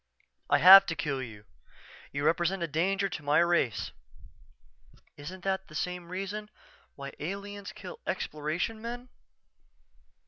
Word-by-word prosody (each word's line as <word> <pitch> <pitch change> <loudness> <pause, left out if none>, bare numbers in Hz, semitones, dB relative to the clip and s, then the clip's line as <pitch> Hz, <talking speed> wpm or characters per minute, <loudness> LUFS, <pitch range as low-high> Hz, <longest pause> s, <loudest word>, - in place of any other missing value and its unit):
_" - - -35 0.3
"I - - +5
have 195 +2 +10
to 165 - -2
kill 145 -4 -2
you. 110 -4 -9 0.7
You 140 +1 -3
represent 175 +3 +1
a - - -1
danger 190 +6 0
to 175 - -6
my 145 +1 +2
race." 170 - +2 1.2
"_Isn't 175 +5 -9
that 190 0 -1
the 155 - -13
same 180 +1 -4
reason 195 +3 -5 0.5
why 140 -1 -8
aliens 200 +5 -6
kill 485 - -10
Exploration 160 +9 -3
men? 245 +2 -6
175 Hz, 135 wpm, -29 LUFS, 155-195 Hz, 1.2 s, have